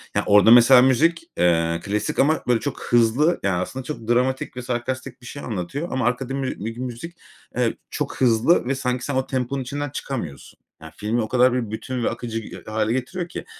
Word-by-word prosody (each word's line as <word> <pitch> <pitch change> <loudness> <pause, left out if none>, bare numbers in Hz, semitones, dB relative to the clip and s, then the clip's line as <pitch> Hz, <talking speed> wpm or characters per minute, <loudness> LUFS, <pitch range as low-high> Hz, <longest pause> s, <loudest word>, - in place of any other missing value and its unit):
Ya, - - +2
orada 105 +2 +6
mesela 120 +2 +8
müzik, 160 +6 +3
eee, 85 -1 +2
klasik 105 +1 -2
ama, 155 +3 +3
böyle, 120 -2 +3
çok 140 +1 -5
hızlı. 120 +8 +3
Yani, 95 -2 +1
aslında 130 +8 -5
çok 125 -5 -7
dramatik 125 +1 0
ve 125 - -3
sarkastik 125 +1 -4
bir - - -14
şey 140 +3 -8
anlatıyor 115 - -4
ama 130 -2 -1
arkada 125 +2 -1
mü 135 -1 -2
bir 115 +3 -5
müzik, 130 +7 -6 0.4
eee, - - +2 0.2
çok - - -4
hızlı 120 +6 +4
ve, 135 - 0
sanki, 125 -1 -2
sen 140 - -3
o 130 0 0
temponun 130 +1 -2
içinden 145 +3 -4
çıkamıyorsun. 115 - -6 0.2
Yani, 80 - -10
filmi 110 +3 -1
o 110 - -2
kadar 125 +1 +3
bir 120 -4 -2
bütün 125 +3 -4
ve - - +2
akıcı 115 -1 -4 0.2
h - - -8
hâle 110 +1 0
getiriyor 170 +8 -3
ki, - - -7
125 Hz, 205 wpm, -22 LUFS, 115-135 Hz, 0.4 s, mesela